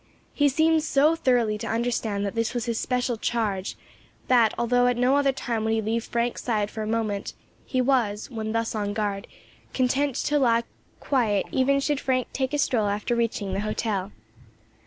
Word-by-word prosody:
He 290 -1 +3
seemed 315 +3 +3
so 305 +1 +3
thoroughly 240 -8 +1
to - - -5
understand 225 -3 -1
that 200 - -3
this 230 +1 -1
was 240 - -1
in 235 - -1
his 225 - -2
special 250 -2 -1
charge, 215 -4 -2 0.5
that 235 -4 +5
although 245 +1 +2
at 245 -1 +1
no 250 +3 +3
other 285 -1 +3
time 235 -4 -3
would 220 0 +1
he 225 - +1
leave 225 +2 -1
Frank's 235 0 -1
side 210 -4 0
for 220 - -5
a 215 - -3
moment, 215 -3 -2 0.3
he 255 - +1
was, 240 -6 +1
when 220 -2 -4
thus 230 0 -1
on 205 -2 -2
guard, 205 -2 -2 0.5
content 265 +1 +1
to 295 0 +1
lie 235 -3 +3 0.4
quiet 220 -8 +1
even 275 +1 +2
should 285 0 0
Frank 255 -1 0
take 265 -1 -1
a 295 - 0
stroll 245 -7 +1
after 210 +4 -1
reaching 225 -4 -1
the 195 - -1
hotel. 210 -2 -2
235 Hz, 190 wpm, -25 LUFS, 215-260 Hz, 0.5 s, that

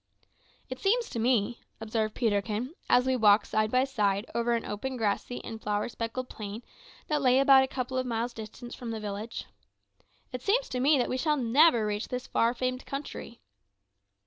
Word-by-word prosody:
"It 255 0 -6
seems 465 +4 +1
to 230 - -3
me," 235 -1 +1 0.2
observed 220 -1 -2
Peterkin, 220 +4 -1 0.2
as 250 0 +5
we 260 0 +2
walked 210 -3 +5
side 215 0 0
by 255 +3 +3
side 210 -6 0
over 235 0 +1
an 230 - -3
open 255 +6 -4
grassy 220 +2 -2
and 225 -1 -7
flower 205 0 -1
speckled 235 +2 -4
plain 210 +1 -7 0.4
that 300 -1 0
lay 255 -1 +4
about 270 -1 +7
a - - -1
couple 260 0 -3
of 255 - -2
miles 235 +1 -2
distant 225 +2 -9
from 240 - -7
the 225 -1 -3
village 210 +2 -5 0.9
"it 250 -2 -5
seems 475 - +1
to 250 - -2
me 285 +3 +4
that 245 - +1
we 255 - -2
shall 300 +3 +1
never 245 -1 +4
reach 210 +1 -2
this 250 0 -4
far 235 +2 +1
famed 255 +1 -2
country." 275 -4 -6
240 Hz, 185 wpm, -29 LUFS, 220-260 Hz, 0.9 s, about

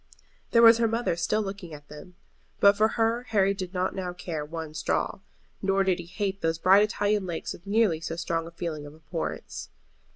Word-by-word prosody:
There 230 0 +5
was 230 0 +8
her 230 - +3
mother 230 -4 0
still 210 +5 0
looking 195 -5 -7
at 145 0 -14
them; 150 +4 -12 0.4
but 200 0 +6
for 215 +2 +4
her 230 +1 +2
Harry 200 -3 +3
did 185 -2 -5
not 185 0 -1
now 180 -2 -4
care 170 -4 -5
one 160 0 -6
straw. 155 - -1 0.4
Nor 195 0 +2
did 190 -2 +1
he 170 - -8
hate 195 +1 -3
those 165 0 0
bright 190 +4 +6
Italian 205 -1 +1
lakes 170 -2 -4
with 175 - -14
nearly 200 -6 +2
so 165 0 -4
strong 165 -1 -2
a - - -10
feeling 160 -3 -5
of 145 - -12
abhorrence. 80 - -5
185 Hz, 200 wpm, -27 LUFS, 165-205 Hz, 0.4 s, was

